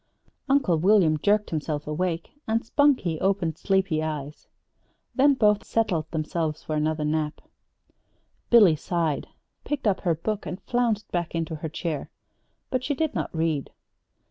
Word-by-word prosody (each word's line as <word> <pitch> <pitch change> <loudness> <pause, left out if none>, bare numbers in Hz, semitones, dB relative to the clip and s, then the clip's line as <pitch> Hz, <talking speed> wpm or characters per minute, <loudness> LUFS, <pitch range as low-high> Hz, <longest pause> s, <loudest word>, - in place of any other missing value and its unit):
Uncle 270 -12 +3
William 180 -3 +4
jerked 210 +4 +2
himself 150 -2 -2
awake, 165 +2 -2 0.2
and 225 +1 0
Spunkie 250 - +2
opened 190 -5 0
sleepy 190 -5 +1
eyes. 150 -2 -5 0.7
Then 280 +1 +4
both 210 -4 +3
settled 175 -9 0
themselves 160 -1 -2
for 155 - -4
another 155 0 0
nap. 150 0 -1 1.1
Billy 205 -9 +7
sighed, 160 -1 -1 0.4
picked 295 -4 -3
up 200 -3 +2
her 170 -3 +1
book, 210 +6 -3
and 180 - -5
flounced 235 -4 0
back 175 -1 -2
into 165 -1 -2
her 160 +1 -5
chair. 155 -2 -4 0.6
But 255 -1 0
she 285 - -1
did 315 +1 -1
not - - -2
read. 160 -3 -1
170 Hz, 145 wpm, -25 LUFS, 155-215 Hz, 1.1 s, Billy